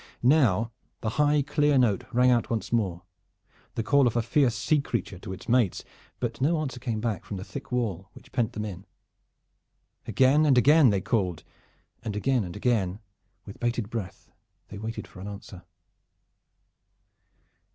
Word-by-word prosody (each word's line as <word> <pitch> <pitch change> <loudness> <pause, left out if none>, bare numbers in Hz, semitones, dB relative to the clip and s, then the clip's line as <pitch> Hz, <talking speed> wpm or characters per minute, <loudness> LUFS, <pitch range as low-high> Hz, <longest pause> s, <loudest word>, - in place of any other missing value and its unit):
Now 120 -5 +3 0.3
the 110 - -1
high 145 0 +3
clear 150 0 +2
note 115 -7 +2
rang 125 +1 +4
out 120 -2 +1
once 115 0 -2
more, 95 -7 0 0.7
the 115 - -1
call 140 +2 +4
of 120 - -1
a 120 - +2
fierce 125 0 +2
sea 150 +6 +1
creature 100 -8 -4
to 95 - -8
its 95 0 -9
mates, 120 -6 +2 0.4
but 120 0 -3
no 160 +4 +2
answer 135 -5 -4
came 120 -3 -3
back 110 -5 -2
from 100 - -6
the 95 - -6
thick - - -9
wall 105 -7 -2
which - - -16
pent 115 -3 0
them 105 - -4
in. 95 -2 -8 1.2
Again 135 +4 +4
and 140 -4 +4
again 145 +2 +6
they 100 -2 +1
called, 90 -8 -1 0.6
and 110 -3 -4
again 125 +2 +1
and 90 -2 -7
again 105 -4 0 0.5
with 100 - -11
bated 120 -2 -2
breath 105 -5 -6 0.4
they 100 - -8
waited 110 +2 -5
for 90 - -14
an 95 - -7
answer. 100 -3 -9
115 Hz, 165 wpm, -27 LUFS, 100-130 Hz, 1.2 s, again